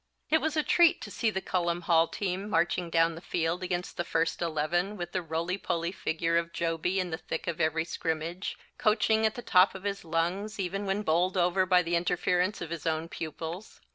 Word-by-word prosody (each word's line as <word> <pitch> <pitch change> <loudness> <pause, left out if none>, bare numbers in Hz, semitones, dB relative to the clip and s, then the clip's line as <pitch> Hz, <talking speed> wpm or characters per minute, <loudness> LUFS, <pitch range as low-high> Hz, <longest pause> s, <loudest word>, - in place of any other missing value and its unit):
It 315 - +4
was 315 0 -1
a 305 - +3
treat 340 +1 +5
to - - -7
see 230 - +1
the 190 -3 -3
Cullom 175 -1 0
Hall 165 -1 +4
team 195 +2 -3
marching 175 -1 +1
down 165 0 +3
the 165 - -9
field 170 0 -1
against 180 -1 -3
the 175 - 0
first 165 0 0
Eleven 170 +5 0
with 175 -1 -5
the 185 - -1
roly 170 +3 -2
poly 170 -2 -1
figure 165 -2 0
of 170 0 -1
Jobey 170 +3 -1
in 180 -2 -2
the 160 - -3
thick 165 - -4
of 170 0 -2
every 160 +1 +1
scrimmage, 165 +2 -3 0.2
coaching 220 +1 +3
at 215 - -4
the 240 - -6
top 185 +2 +5
of 190 - -8
his 200 -1 -3
lungs, 175 +6 -1
even 195 +2 -2
when 195 +2 0
bowled 180 +2 +1
over 180 +1 +2
by 180 -1 +5
the 170 0 0
interference 180 +3 +1
of 170 -2 -5
his 165 -2 -4
own 160 +1 -1
pupils. 165 +5 -6
175 Hz, 210 wpm, -29 LUFS, 165-190 Hz, 0.2 s, treat